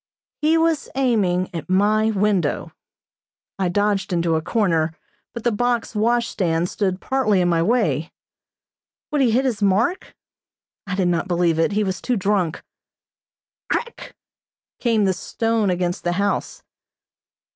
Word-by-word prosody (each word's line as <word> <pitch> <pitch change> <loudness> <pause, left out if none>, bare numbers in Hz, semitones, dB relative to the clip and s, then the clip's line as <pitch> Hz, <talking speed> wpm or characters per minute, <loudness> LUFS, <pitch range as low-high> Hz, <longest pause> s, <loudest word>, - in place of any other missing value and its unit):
He 315 +2 +3
was 325 -2 +1
aiming 200 -10 +1
at 165 +1 -6
my 210 +3 +3
window. 200 -7 0 0.9
I 185 -2 +1
dodged 205 +1 0
into 170 -2 +1
a 160 - 0
corner, 165 -5 +1 0.4
but 235 - -7
the 240 - +2
box 240 +2 -1
washstand 210 -7 0
stood 190 -3 -1
partly 255 -7 +1
in 180 - +2
my 170 -1 +2
way. 195 -5 +1 1.0
Would 295 -2 +1
he 255 - +4
hit 250 +4 +2
his 235 -5 -1
mark? 205 - +1 0.7
I 195 - -2
did 185 -2 +1
not 170 0 0
believe 170 -2 +1
it. 185 +5 +2
He 210 +1 +1
was 190 -2 -3
too 250 - 0
drunk. 195 -4 0 1.1
Crack! 475 0 -4 0.6
came 225 -4 +2
the 190 - +2
stone 225 +3 -1
against 180 -1 -1
the 175 - 0
house. 200 +2 -2
200 Hz, 140 wpm, -21 LUFS, 180-230 Hz, 1.1 s, he